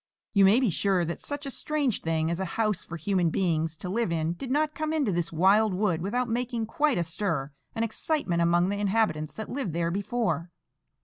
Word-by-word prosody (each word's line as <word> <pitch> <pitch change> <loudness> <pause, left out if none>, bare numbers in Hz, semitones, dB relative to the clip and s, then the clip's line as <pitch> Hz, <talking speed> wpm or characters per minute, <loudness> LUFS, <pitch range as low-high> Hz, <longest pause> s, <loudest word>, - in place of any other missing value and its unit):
You 200 -1 +6
may 205 +6 +6
be 250 -7 +2
sure 185 0 +1
that 170 - -5
such 285 0 -3
a 275 - -4
strange 285 -5 -1
thing 160 0 0
as 170 - -2
a 190 - -1
house 215 -4 +1
for 170 - -7
human 175 +1 +1
beings 160 -2 0
to 180 - -6
live 215 0 0
in 165 0 0
did 245 +9 -7
not 300 +3 +1
come 310 0 -2
into 285 -9 +1
this 170 -1 -1
wild 195 +5 +4
wood 180 -4 +1
without 240 +7 -1
making 235 -1 -1
quite 295 +2 +1
a 175 - +1
stir 165 -4 -2 0.2
and 225 - +1
excitement 225 - -1
among 175 +2 +3
the 200 0 -2
inhabitants 200 -7 0
that 220 - -5
lived 255 - -3
there 170 0 0
before. 190 -4 -1
195 Hz, 210 wpm, -27 LUFS, 170-235 Hz, 0.2 s, You